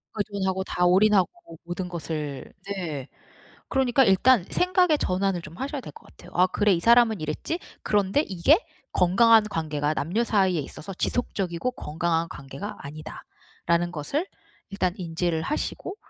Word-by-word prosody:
의존하고 195 -2 -1
다 180 -1 0
올인하고 190 +1 +4 0.4
모든 180 +1 -4
것을 155 -5 -5 0.2
네 160 -9 -4 0.6
그러니까 265 -1 +3
일단 215 +1 +4
생각의 360 -3 +3
전환을 185 -5 0
좀 165 +1 -11
하셔야 280 +1 -3
될 - - -9
것 455 - -16
같아요. - - -16
'아 180 +1 +4
그래 205 +1 +2
이 170 - +1
사람은 230 -2 +4
이랬지? 155 - -3 0.2
그런데 205 +5 +2
이게 190 - +4 0.4
건강한 220 +5 +5
관계가 155 -5 -1
남녀 180 +12 0
사이에 190 -7 +2
있어서 165 +6 -8
지속적이고 195 0 -2
건강한 165 -4 -1
관계가 145 +8 -8
아니다.'라는 170 +3 -4
것을 180 - -2 0.4
일단 185 -2 -1
인지를 170 -2 -1
하시고 305 +5 -3
185 Hz, 335 characters per minute, -25 LUFS, 170-220 Hz, 0.6 s, 건강한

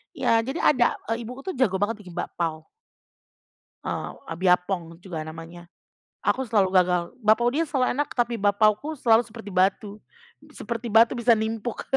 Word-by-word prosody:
Ya 230 - +2
jadi 265 +8 -3
ada, 250 -5 +3 0.2
eee, 230 +1 -2
ibuku 255 +3 -9
tuh 375 - -4
jago 210 -7 +2
banget 205 +3 -1
bikin 180 -4 -12
bakpau. 160 -2 -4 1.1
Eee, - - -4 0.2
e - - -3
biapong 180 -2 +1
juga 165 -5 -6
namanya, 165 +2 -10 0.6
aku 265 - +1
selalu 200 -4 +2
gagal. 180 -1 +1 0.2
Bakpau 220 +3 +3
dia 325 +3 +1
selalu 260 -3 +1
enak, 290 - 0
tapi 235 -1 0
bakpauku 215 +9 +2
selalu 230 -2 +4
seperti 220 -3 -10
batu 200 +3 0 0.5
seperti 235 0 -5
batu, 225 +3 +5
bisa 235 -1 +4
nimpuk. 220 +1 -3
215 Hz, 155 wpm, -25 LUFS, 185-240 Hz, 1.1 s, batu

